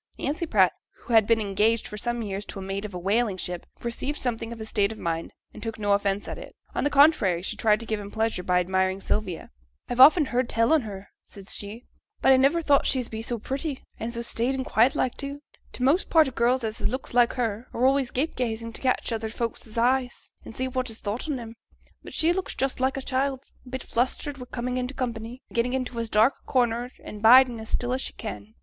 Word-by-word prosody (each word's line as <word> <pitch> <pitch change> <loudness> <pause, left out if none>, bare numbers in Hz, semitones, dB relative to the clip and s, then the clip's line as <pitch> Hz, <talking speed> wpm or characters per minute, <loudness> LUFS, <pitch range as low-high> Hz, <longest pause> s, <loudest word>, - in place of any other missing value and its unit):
Nancy 310 +4 -2
Pratt, 190 - +4 0.2
who 240 - -7
had 220 -2 +6
been 230 -1 +4
engaged 215 +2 +1
for - - -7
some 240 +2 -2
years 200 -1 -4
to - - -8
a - - -5
mate 195 +2 -4
of 200 -3 -7
a - - -2
whaling 200 +3 +1
ship, 180 -1 -5
perceived 255 +5 -3
something 230 -2 -2
of 235 - -6
his 220 -1 -6
state 200 0 +2
of 220 - -8
mind, 165 -3 -3 0.2
and - - -11
took 225 0 -5
no 205 -1 +1
offence 200 0 0
at - - -5
it; - - -11 0.2
on - - -1
the 290 - +2
contrary, 275 - +4
she - - -3
tried 215 -2 +3
to 230 - -5
give 220 -1 -2
him 200 -1 -7
pleasure 220 -3 -1
by 180 0 +2
admiring 190 +1 0
Sylvia. 195 -3 -3 0.4
'I've 245 - -4
often 300 +4 +8
heerd 250 -1 -1
tell 230 +6 +3
on 315 - +4
her,' 200 -3 -8
said 195 -1 -12
she, 210 +4 -4 0.3
'but 265 - +4
I - - +6
niver 285 +6 +3
thought 285 -2 +3
she's 255 -3 0
be 220 0 -5
so 235 +1 -2
pretty, 270 +5 -4 0.2
and 225 +2 -3
so 235 0 -3
staid 235 +3 +1
and 260 -1 -3
quiet 245 +7 +3
like 255 -4 0
too. 280 0 -5 0.3
T' 250 - -5
most 295 +9 +3
part 320 -3 +5
o' - - -4
girls 240 +1 +1
as 220 0 -3
has - - 0
looks 260 +2 -5
like 245 -1 +4
hers 230 -1 -2
are 245 - 0
always 270 -1 +3
gape 290 +6 -1
gazing 230 -2 -3
to - - -8
catch 255 -2 0
other 225 -1 -2
folks's 230 -1 -4
eyes, 250 +1 0
and 225 - -10
see 260 - -1
what 255 -1 -2
is 225 - -5
thought 220 +9 -4
on 275 -4 -1
'em; 225 -1 -8 0.5
but - - -10
she 330 +2 +3
looks 380 +1 -3
just 270 -1 -1
like 260 +1 +1
a 270 - -4
child, 265 0 -1 0.2
a - - -10
bit 260 0 -5
flustered 265 +3 -1
wi' 250 - -8
coming 250 +1 -2
into 255 +2 -3
company, 240 0 -4
and - - -16
gettin' 245 +2 +1
into 255 -2 -2
as 230 -1 -3
dark 220 +5 +4
a - - -36
corner 240 -1 +1
and 210 - -8
bidin' 245 +1 +7
as 220 - -8
still 245 0 0
as 260 - -1
she - - -4
can. 105 +2 -8
235 Hz, 245 wpm, -26 LUFS, 215-260 Hz, 0.5 s, often